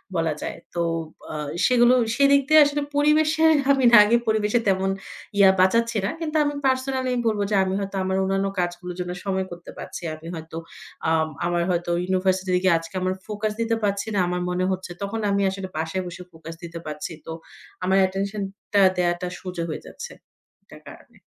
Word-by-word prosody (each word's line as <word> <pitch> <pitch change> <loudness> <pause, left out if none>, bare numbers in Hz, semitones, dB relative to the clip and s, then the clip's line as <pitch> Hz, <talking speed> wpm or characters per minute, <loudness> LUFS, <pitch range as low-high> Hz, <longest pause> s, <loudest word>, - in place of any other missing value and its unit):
বলা 165 -2 +1
যায়। - - -5 0.2
তো 170 - 0 0.5
আ - - -5 0.3
সেগুলো 245 0 +5 0.2
সেদিক 280 0 +5
দিয়ে 310 0 +8
আসলে 290 0 -1
পরিবেশের 310 +2 +4 0.2
আমি 265 -2 +3
না 235 - +9
আগে 235 +3 +4
পরিবেশের 220 +2 +1
তেমন 190 0 +1 0.5
ইয়া 195 -1 +7
বাঁচাচ্ছি 230 +4 +2
না। - - 0
কিন্তু 315 -1 -4
আমি 290 0 -1
পার্সোনালি 260 0 0
আমি 245 - 0
বলব 215 -2 +1
যে, - - +2
আমি 190 0 -2
হয়তো 195 0 -5
আমার 190 0 -1
অন্যান্য 195 +1 0
কাজগুলোর 175 0 -3
জন্য 180 0 -3
সময় 190 -1 -1
করতে 175 0 -9
পারছি। - - -7
আমি 160 +1 -12
হয়তো 160 0 -8 0.5
আম 160 -1 +2 0.2
আমার 175 0 +1
হয়তো 175 0 -1
ইউনিভার্সিটিতে 185 0 +1
গিয়ে 180 -3 +5
আজকে 165 +3 -11
আমার 185 0 0
ফোকাস 210 0 -2
দিতে 230 0 +1
পারছি 200 +1 0
না। - - +2
আমার 180 0 -2
মনে 180 +1 0
হচ্ছে 185 -1 -4
তখন 200 +3 -3
আমি 200 0 +1
আসলে 190 0 -5
বাসায় 160 +4 -2
বসে 175 +1 -8
ফোকাস 165 0 -10
দিতে 170 0 -7
পারছি। 150 +2 -5
তো, 160 - -6 0.5
আমার 190 +1 +3
অ্যাটেনশনটা 195 +1 -1 0.2
দেয়াটা 175 0 0
সোজা 180 -2 -5
হয়ে 155 - -4
যাচ্ছে - - -8 0.5
এটার - - -15
কারণে। - - -16
190 Hz, 185 wpm, -24 LUFS, 175-230 Hz, 0.5 s, না